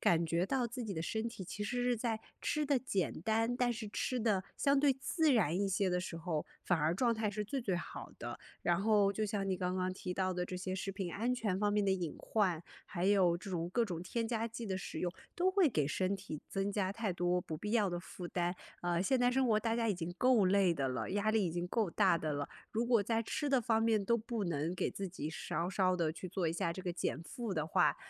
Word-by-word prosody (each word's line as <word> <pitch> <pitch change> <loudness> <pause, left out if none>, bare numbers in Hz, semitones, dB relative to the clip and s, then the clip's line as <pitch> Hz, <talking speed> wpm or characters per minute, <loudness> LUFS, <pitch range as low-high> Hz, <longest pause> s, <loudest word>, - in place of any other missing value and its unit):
感 170 -1 +4
觉 170 +2 +1
到 255 0 +1
自 240 +1 -5
己 205 - -3
的 160 - -2
身 220 +5 -1
体 210 -5 -8
其 205 +3 -5
实 245 +3 -1
是 245 -1 +2
在 225 -1 -1 0.2
吃 300 0 0
得 280 -2 +3
简 200 -8 -1
单， 225 +2 +1
但 245 -1 +2
是 215 -2 -5
吃 250 +4 -1
得 205 -4 +2
相 280 -1 +3
对 280 -1 +5
自 300 +3 +2
然 185 - +3
一 200 -1 +1
些 195 0 +1
的 180 - +1
时 180 -2 -5
候， 165 -2 -2 0.2
反 175 -3 +2
而 155 +3 +2
状 235 +4 +3
态 215 -2 0
是 210 +1 -3
最 270 +6 -2
最 200 -6 0
好 170 - -7
的。 - - -5 0.2
然 175 +1 +2
后 205 -2 +4
就 215 +2 -1
像 200 -1 -1
你 185 - +1
刚 180 0 -1
刚 185 0 0
提 185 -1 -4
到 185 -1 0
的， 180 0 -1
这 180 0 -5
些 185 +1 -3
食 195 +1 -3
品 185 -3 -4
安 240 +5 0
全 205 -6 -1
方 205 0 +2
面 205 -1 +2
的 195 - +2
隐 180 -5 -1
患， 185 -7 +1 0.2
还 175 -2 -3
有 185 -4 +4
这 195 +3 -8
种 170 -2 -1
各 235 +3 +2
种 175 -4 -4
添 230 +5 -2
加 230 -1 0
剂 230 +1 -6
的 190 -2 -1
使 185 - -5
用， 175 -1 -1 0.2
都 365 +2 +2
会 375 -5 +4
给 150 - +1
身 185 +5 0
体 185 -6 -6
增 195 +1 -1
加 195 -2 0
太 215 -3 -1
多 175 +1 +1
不 160 -2 -5
必 210 +6 -4
要 215 -4 +3
的 175 - -2
负 180 0 -7
担。 175 0 0 0.3
呃， 175 0 +1
现 260 +6 +2
在 245 0 +4
生 260 0 +2
活 215 -2 +4
大 225 0 0
家 230 -1 +1
已 205 - +2
经 175 0 -4
够 250 -5 +5
累 195 -2 +4
的 135 -3 0
了， 130 +6 -3
压 205 +2 +1
力 220 -2 +3
已 - - -1
经 175 +1 -2
够 205 -1 0
大 185 -4 +4
的 155 -1 -2
了， 145 0 -2 0.2
如 230 +2 0
果 235 -4 +4
在 225 +2 +1
吃 290 +5 -2
的 270 -2 +4
方 225 -2 +2
面 220 -3 +3
都 235 +4 +3
不 230 -1 -3
能 165 0 -1
给 - - 0
自 195 -1 -4
己 160 -3 -5
稍 170 +2 -2
稍 185 -1 +2
地 160 -2 +1
去 185 - -7
做 180 -1 -1
一 - - -1
下 170 0 -1
这 185 - -7
个 180 -2 -2
减 165 -3 -2
负 225 +4 -5
的 155 -1 -1
话， 160 - +3
195 Hz, 285 characters per minute, -34 LUFS, 175-230 Hz, 0.3 s, 对